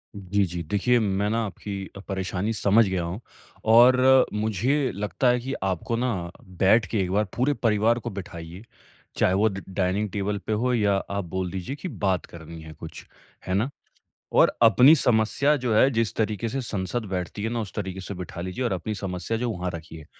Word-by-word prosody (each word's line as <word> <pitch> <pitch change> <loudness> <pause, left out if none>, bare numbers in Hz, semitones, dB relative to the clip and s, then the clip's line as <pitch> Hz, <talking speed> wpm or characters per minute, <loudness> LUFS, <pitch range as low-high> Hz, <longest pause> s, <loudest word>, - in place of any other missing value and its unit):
जी, 100 +1 0
जी। 90 -1 -5
देखिए 120 +5 +3
मैं 100 -1 0
ना 115 +1 0
आपकी 100 +1 -7 0.2
अ, - - -7
परेशानी 95 +2 -2
समझ 105 +1 +4
गया 95 -2 -1
हूँ, 85 +4 -4 0.5
और 125 +3 +6
मुझे 110 +7 0
लगता 105 +5 -1
है 125 0 +3
कि 130 +3 -5
आपको 95 +4 -1
ना, 105 -9 -2 0.3
बैठ 105 +3 +5
के 105 +3 -2
एक 90 -1 -2
बार 105 +2 +2
पूरे 130 +4 +2
परिवार 115 +1 +3
को 120 - -5
बिठाइए। 90 -2 -8 0.5
चाहे 90 - +3
वो 105 +3 +3
द 95 -1 -7
डाइनिंग 95 +2 -1
टेबल 100 +1 -2
पे 110 - 0
हो 125 +4 +1
या 105 -4 +2
आप 100 0 -3
बोल 90 +1 -3
दीजिए 95 +8 -5
की 165 - -6 0.2
बात 95 -3 +1
करनी 80 -1 -11
है 80 0 -10
कुछ। 80 +1 -10 0.4
है 95 - -1
ना? 105 +7 +1 0.6
और - - +5
अपनी 125 +7 +7
समस्या 125 +4 +2
जो 120 -3 +1
है 130 +5 +6
जिस 115 -3 0
तरीक़े 110 +1 -1
से 135 +4 -3
संसद 110 0 -3
बैठती 95 +2 -4
है 110 - -1
ना 120 - -1
उस 105 - -7
तरीक़े 95 -2 -4
से 100 - -6
बिठा 90 -1 -7
लीजिए 90 +8 -4
और 120 - 0
अपनी 95 +4 -3
समस्या 95 +2 -3
जो 120 +1 -2
वहाँ 90 -2 -3
रखिए। 80 -1 -10
105 Hz, 200 wpm, -25 LUFS, 95-115 Hz, 0.6 s, अपनी